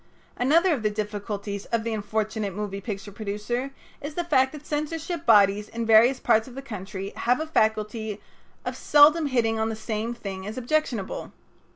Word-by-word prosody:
Another 330 +8 +3
of 270 - -2
the 215 - +1
difficulties 205 -1 -4
of 230 -1 -1
the 230 0 -2
unfortunate 215 -1 -2
moving 200 -1 -4
picture 205 -1 -6
producer 215 +5 -3 0.3
is 290 +1 -6
the 350 - -1
fact 265 -6 +3
that 300 -1 -10
censorship 315 +2 -3
bodies 205 -1 +5
in 230 0 -3
various 230 +4 +6
parts 220 0 +3
of 250 - -11
the 270 - -7
country 195 -4 -6
have 245 +3 +1
a 315 - -2
faculty 220 -5 0 0.5
of - - -3
seldom 300 +2 +5
hitting 225 -4 +1
on 220 0 0
the 220 - -3
same 220 +1 -3
thing 195 -4 -6
as 215 - -6
objectionable. 250 -6 -2
220 Hz, 175 wpm, -25 LUFS, 210-265 Hz, 0.5 s, various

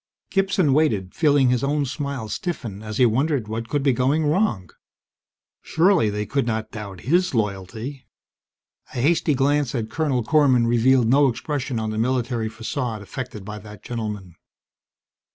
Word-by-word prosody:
Gibson 190 -7 +2
waited, 110 -12 +1
feeling 145 -5 +3
his 125 0 0
own 145 +1 +1
smile 140 -3 -4
stiffen 115 - -4
as 110 0 -6
he 125 - +5
wondered 130 +1 +1
what 115 +1 -4
could 145 -2 0
be 135 -2 +3
going 135 +6 +1
wrong. 145 - 0 0.9
Surely, 170 - +3
they 105 0 -3
could 140 -1 -1
not 110 -1 -2
doubt 100 -5 -8
his 175 +2 +1
loyalty! 110 +6 -3 0.9
A - - -2
hasty 155 +2 +2
glance 140 0 +1
at 110 -2 -3
Colonel 140 -5 0
Korman 130 -2 +4
revealed 120 +1 +3
no 140 +4 +5
expression 130 0 -3
on 110 -1 -2
the 110 - -3
military 120 -2 0
facade 115 0 -4
affected 110 -2 -7
by 105 0 -6
that 105 0 -12
gentleman. 105 -6 -5
125 Hz, 150 wpm, -23 LUFS, 110-145 Hz, 0.9 s, he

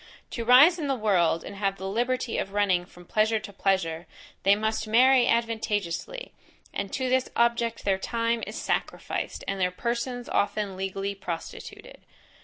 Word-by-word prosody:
To 235 - -3
rise 275 +9 +7
in 300 - -2
the 270 - +1
world, 180 -8 +2
and - - -8
have 195 -1 -1
the 190 - -5
liberty 240 +3 -1
of 195 - -4
running 190 -4 +2
from 175 0 -16
pleasure 215 +4 +2
to 205 -1 -8
pleasure, 175 -4 0 0.3
they 195 +1 +5
must 220 +1 -2
marry 250 +3 +5
advantageously, 225 - -1 0.4
and 200 -1 -4
to 260 -2 -1
this 260 0 +1
object 235 -1 +1
their 195 -1 +2
time 230 +2 -1
is - - -7
sacrificed, - - -3
and 195 -1 -2
their 180 - +3
persons 240 +5 -3
often 200 -1 -1
legally 195 +1 -3
prostituted. 175 -4 -8
215 Hz, 160 wpm, -27 LUFS, 195-235 Hz, 0.4 s, rise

